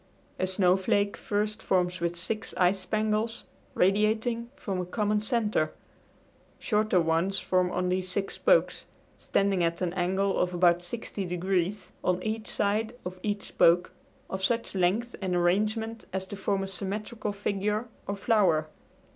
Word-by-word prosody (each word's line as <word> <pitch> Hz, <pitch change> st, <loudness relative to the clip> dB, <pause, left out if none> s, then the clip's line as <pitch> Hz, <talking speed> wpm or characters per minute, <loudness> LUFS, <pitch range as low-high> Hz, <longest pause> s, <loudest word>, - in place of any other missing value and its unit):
A 185 Hz, -, +1 dB
snowflake 190 Hz, +2 st, +2 dB
first 210 Hz, +1 st, -2 dB
forms 180 Hz, -1 st, +1 dB
with 170 Hz, 0 st, -1 dB
six 215 Hz, +5 st, -4 dB
ice 180 Hz, +2 st, +3 dB
spangles, 215 Hz, +2 st, -1 dB, 0.3 s
radiating 220 Hz, +5 st, +2 dB
from 195 Hz, -9 st, -3 dB
a -, -, -3 dB
common 210 Hz, +2 st, +1 dB
center. 215 Hz, -9 st, 0 dB, 0.8 s
Shorter 215 Hz, -3 st, +2 dB
ones 165 Hz, +4 st, +1 dB
form 185 Hz, -1 st, +1 dB
on 180 Hz, 0 st, -1 dB
these 185 Hz, 0 st, -1 dB
six 195 Hz, +1 st, -2 dB
spokes, -, -, +2 dB, 0.3 s
standing 195 Hz, -3 st, +1 dB
at 170 Hz, 0 st, 0 dB
an 180 Hz, -2 st, -1 dB
angle 190 Hz, +2 st, +1 dB
of 180 Hz, 0 st, 0 dB
about 175 Hz, 0 st, +4 dB
sixty 200 Hz, +2 st, -4 dB
degrees, 180 Hz, +2 st, -1 dB
on 180 Hz, 0 st, +2 dB
each 220 Hz, 0 st, -3 dB
side 215 Hz, +3 st, 0 dB
of 185 Hz, 0 st, -6 dB
each 205 Hz, 0 st, -2 dB
spoke, 170 Hz, +1 st, +3 dB, 0.4 s
of 190 Hz, 0 st, -5 dB
such 230 Hz, +3 st, 0 dB
length 195 Hz, +6 st, +1 dB
and 185 Hz, -2 st, -1 dB
arrangement 215 Hz, +6 st, 0 dB
as 190 Hz, 0 st, -3 dB
to 200 Hz, -, -7 dB
form 195 Hz, 0 st, -1 dB
a -, -, -3 dB
symmetrical 210 Hz, +3 st, -4 dB
figure 205 Hz, +2 st, -1 dB, 0.2 s
or 200 Hz, -, -1 dB
flower. 190 Hz, -7 st, +2 dB
195 Hz, 145 wpm, -28 LUFS, 180-215 Hz, 0.8 s, about